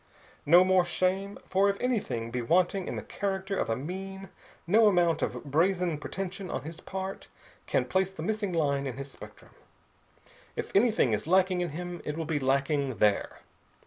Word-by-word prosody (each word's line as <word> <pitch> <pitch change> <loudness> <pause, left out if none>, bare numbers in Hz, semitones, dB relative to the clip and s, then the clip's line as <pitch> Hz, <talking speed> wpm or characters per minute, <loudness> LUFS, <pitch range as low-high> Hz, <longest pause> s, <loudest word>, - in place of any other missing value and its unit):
"No 175 +4 +8
more 185 -1 +4
shame. 185 +3 -1 0.2
If 200 +1 +3
anything 200 - -1
be 125 0 -2
wanting 180 +8 +2
in - - -3
the - - -5
character 195 0 -3
of - - -1
a 115 - +1
mean, 190 +7 -6 0.4
no 215 +6 +5
amount 175 -4 +3
of - - -2
brazen 170 +2 +1
pretension 190 +3 -5
on 130 - -3
his 160 +3 -8
part 190 0 -5 0.4
can - - +1
place 190 0 0
the 185 -5 -7
missing 210 0 -1
line 140 -4 0
in 130 -1 -5
his 140 0 -7
spectrum. - - -13 1.0
If - - -4
anything 210 - +4
is 105 +7 -2
lacking 185 0 +3
in 175 - -1
him, 175 +3 -6
it 150 +1 -4
will 165 - -2
be 155 -1 -1
lacking 135 0 +1
there. 105 0 +1
180 Hz, 175 wpm, -29 LUFS, 145-195 Hz, 1.0 s, No